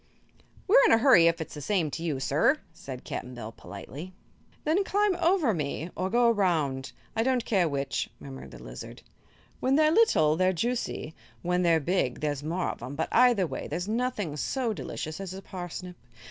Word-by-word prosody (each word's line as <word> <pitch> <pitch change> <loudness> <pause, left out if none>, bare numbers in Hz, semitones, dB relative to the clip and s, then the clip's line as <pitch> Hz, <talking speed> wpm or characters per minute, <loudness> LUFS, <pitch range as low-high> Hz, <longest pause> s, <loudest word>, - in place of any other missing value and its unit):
"We're - - +7
in - - +5
a - - +7
hurry, 225 -9 +6
if 165 0 +2
it's 160 - -6
the 150 - -7
same 165 -1 0
to 165 - -5
you, 155 -5 -1
sir," 150 - +2 0.2
said 130 -5 -8
Cap'n 125 0 -6
Bill, 110 -2 -7
politely. 140 - -9 0.5
"Then 330 +6 +2
climb 405 0 +2
over 340 - +3
me 155 +1 -3
or 185 +1 -1
go 240 +3 +4
around 150 - 0 0.2
I 225 - +2
don't 255 0 +1
care 185 -6 +2
which," 140 -2 -2
murmured 65 -2 -9
the - - -12
lizard. - - -9 0.6
"When 265 +1 +2
they're 310 +1 +5
little, 235 - +4
they're 185 +1 +3
juicy; 230 -5 -2 0.3
when 180 +1 +1
they're 170 -2 +4
big, 150 -5 0
there's 145 -2 -2
more 170 +5 -1
of - - -11
'em; 130 +4 -6
but 160 - -2
either 240 -6 +5
way - - -5
there's 175 +5 -3
nothing 220 - -1
so 240 - -1
delicious 155 -5 -5
as 190 -1 -6
a 195 - -7
parsnip. 180 -1 -7
180 Hz, 190 wpm, -28 LUFS, 145-235 Hz, 0.6 s, We're